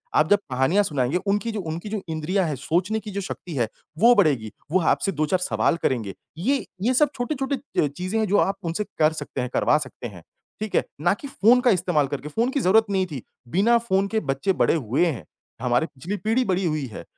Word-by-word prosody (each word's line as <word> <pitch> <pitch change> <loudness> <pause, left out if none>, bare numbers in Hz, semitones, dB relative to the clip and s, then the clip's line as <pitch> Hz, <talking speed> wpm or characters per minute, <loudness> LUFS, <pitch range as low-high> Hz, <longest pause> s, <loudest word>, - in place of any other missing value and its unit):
आप 155 +1 +4
जब 205 - +5
कहानियाँ 130 +11 +3
सुनाएँगे, 145 -2 0
उनकी 205 +4 -1
जो 215 - -4
उनकी 170 +3 -5
जो 210 -1 -3
इंद्रियाँ 170 +4 0
हैं, 150 - -2
सोचने 175 - 0
की 210 0 -8
जो 200 +1 -3
शक्ति 180 -3 -6
है 120 -3 +1 0.3
वो 235 +3 +7
बढ़ेगी, 135 - +2 0.2
वो 185 - +4
आपसे 190 +3 +1
2-4 155 +3 0
सवाल 175 - +1
करेंगे, 110 -7 -1 0.2
ये 265 +10 0 0.2
ये 250 +5 +2
सब 295 +2 +4
छोटे-छोटे 270 +2 -2 0.3
अ, - - +2
चीज़ें 185 +9 -3
हैं 220 - +1
जो 205 +2 +3
आप 195 +1 +2
उनसे 170 +5 -1 0.2
कर 155 0 +4
सकते 140 - -4
हैं, 125 - -3
करवा 150 - +3
सकते 130 -4 -6
हैं, 90 -6 -12 0.4
ठीक 215 -1 -4
है? - - +4 0.2
ना 175 +4 +3
कि 245 +8 -8
फ़ोन 245 -1 +4
का 245 -2 +4
इस्तेमाल 175 -6 +1
करके, 145 +1 -5
फ़ोन 230 - 0
की 280 - 0
ज़रूरत 220 +2 +4
नहीं 190 -1 +1
थी, 135 -5 -6 0.2
बिना 210 - +3
फ़ोन 200 -4 +1
के 220 +1 0
बच्चे 165 +9 0
बड़े - - +3
हुए 135 +3 +1
हैं, 125 - -3 0.4
हमारी 125 +4 +2
पिछली 165 +10 -6
पीढ़ी 225 +7 +1
बड़ी 185 0 0
हुई 155 -4 -1
है, 110 - -9
180 Hz, 225 wpm, -24 LUFS, 150-215 Hz, 0.4 s, वो